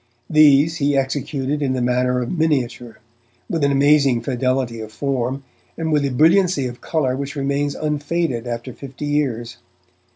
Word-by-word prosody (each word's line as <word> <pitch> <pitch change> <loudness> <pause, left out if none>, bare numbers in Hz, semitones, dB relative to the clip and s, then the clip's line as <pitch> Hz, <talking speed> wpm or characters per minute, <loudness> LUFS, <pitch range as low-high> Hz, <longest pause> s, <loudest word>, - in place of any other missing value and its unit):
These 155 +1 +5
he 145 -2 +1
executed 135 +1 -2
in 135 -2 0
the 130 - -1
manner 125 0 +1
of 120 - -4
miniature, 130 -7 -1 0.5
with 165 -4 -2
an 140 - +3
amazing 140 -3 +3
fidelity 130 -1 -1
of 110 0 -8
form 135 +2 -2 0.3
and 160 -1 -2
with 150 -2 +2
a 140 - 0
brilliancy 165 +2 +3
of 120 -1 -6
colour 135 -6 -1
which 140 +1 -5
remains 140 +1 -1
unfaded 150 -4 -2
after 120 +1 -5
fifty 135 +3 -8
years. 125 -6 -2
140 Hz, 155 wpm, -20 LUFS, 125-150 Hz, 0.5 s, These